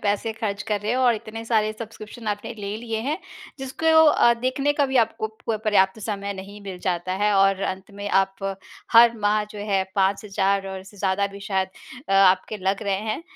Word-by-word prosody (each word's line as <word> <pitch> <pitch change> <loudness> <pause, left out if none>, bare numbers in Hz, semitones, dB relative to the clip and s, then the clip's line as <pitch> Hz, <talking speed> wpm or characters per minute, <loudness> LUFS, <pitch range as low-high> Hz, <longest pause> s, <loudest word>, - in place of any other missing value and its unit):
पैसे 205 +2 0
खर्च 210 -2 -3
कर 205 -2 0
रहे 210 +2 -2
हैं 250 - +1
और 245 -2 +4
इतने 225 +1 -7
सारे 215 -2 +1
सब्स्क्रिप्शन 220 +1 -9
आपने 205 +3 -3
ले 200 +1 -4
लिए 225 -1 -4
हैं, 290 +9 -2 0.4
जिसको 270 +4 -4 0.2
अ, 240 -5 +5
देखने 275 +3 +1
का 285 -1 +1
भी 265 0 -1
आपको 220 0 -5 0.2
प 220 - +1
पर्याप्त 205 -1 +3
समय 200 -1 -3
नहीं 200 +2 -9
मिल 190 -2 -7
जाता 180 +1 -1
है 210 - +3
और 195 0 +4
अंत 190 +2 -4
में 205 0 -5
आप 195 0 +1 0.5
हर 230 0 +7
माह, 210 0 +2
जो 210 0 -11
है, 200 -2 0
5,000 195 0 +1
और 190 0 -6
इससे 195 +2 -15
ज़्यादा 195 +1 +1
भी 200 0 -10
शायद 190 -1 -1 0.4
अ, - - 0
आपके 195 +2 +4
लग 195 +2 -1
रहे 200 -2 0 0.2
हैं, - - -5
205 Hz, 200 wpm, -24 LUFS, 195-225 Hz, 0.5 s, हर